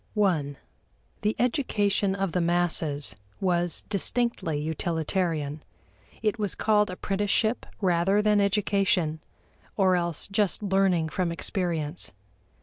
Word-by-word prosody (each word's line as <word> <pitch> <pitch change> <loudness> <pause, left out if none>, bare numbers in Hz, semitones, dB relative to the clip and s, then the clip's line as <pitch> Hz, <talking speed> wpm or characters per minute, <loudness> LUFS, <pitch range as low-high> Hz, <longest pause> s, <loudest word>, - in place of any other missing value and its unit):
(i) 155 -9 +2 0.7
The 210 0 +1
education 205 -6 +1
of 195 -2 -1
the 180 - 0
masses 170 -4 0 0.2
was 175 -2 0
distinctly 205 -6 -1
utilitarian. 160 -1 -1 0.6
It 215 +1 +1
was 205 -3 -2
called 210 -1 +3
apprenticeship 205 +5 0
rather 185 +2 +3
than 210 -1 +3
education, 195 -5 +1 0.6
or 190 -2 +4
else 170 -3 -1
just 200 0 0
learning 190 -5 +2
from 175 +1 -1
experience. 170 -2 -2
185 Hz, 105 wpm, -27 LUFS, 170-205 Hz, 0.7 s, or